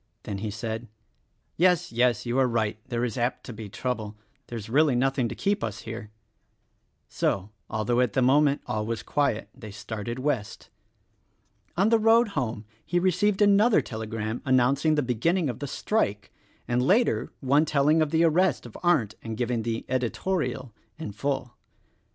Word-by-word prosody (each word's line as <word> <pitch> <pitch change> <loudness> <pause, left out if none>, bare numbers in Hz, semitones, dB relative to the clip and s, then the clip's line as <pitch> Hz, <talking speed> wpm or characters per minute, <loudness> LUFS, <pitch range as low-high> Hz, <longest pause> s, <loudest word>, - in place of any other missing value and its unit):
Then 100 -1 -5
he 110 +1 -3
said, 110 +2 -5 0.7
"Yes, 180 0 +3
yes, 120 -1 +2
you 120 +2 0
are 130 - +4
right 110 -3 -1
— - - -36
there 120 -1 0
is 120 +1 -4
apt 120 +2 -1
to 125 - -8
be 110 -1 -8
trouble. 110 -2 -4 0.3
There 120 - -6
is 105 - -7
really 140 +3 +3
nothing 130 0 +1
to - - -6
keep 200 - 0
us 110 -2 -4
here." 115 -1 -7 1.0
So, 100 +2 -1 0.2
although 110 +3 0
at 125 -5 +2
the 130 - +2
moment 140 +2 +3
all 110 0 -2
was 115 -1 -3
quiet, 140 -7 0
they 115 -5 -10
started 110 +3 -6
West. 130 -6 -3 1.1
On 195 +4 +4
the 230 -1 +4
road 225 +1 +5
home 120 - -3 0.2
he 175 - -1
received 190 +3 +2
another 205 +3 +5
telegram 110 0 -4
announcing 135 +3 +3
the 150 - +1
beginning 145 - +1
of 120 - -11
the 145 - -4
strike, 105 - -1 0.4
and 120 +1 +1
later 205 - +2
one 140 +3 +3
telling 150 +2 +3
of 155 - +2
the 160 +2 +2
arrest 170 -2 +2
of 120 - -11
Arndt 140 - +2
and 110 -1 -6
giving 120 -1 -1
the 115 0 -3
"editorial" 130 - -2 0.2
in 160 -9 -6
full. 125 +3 -3
125 Hz, 170 wpm, -26 LUFS, 110-155 Hz, 1.1 s, road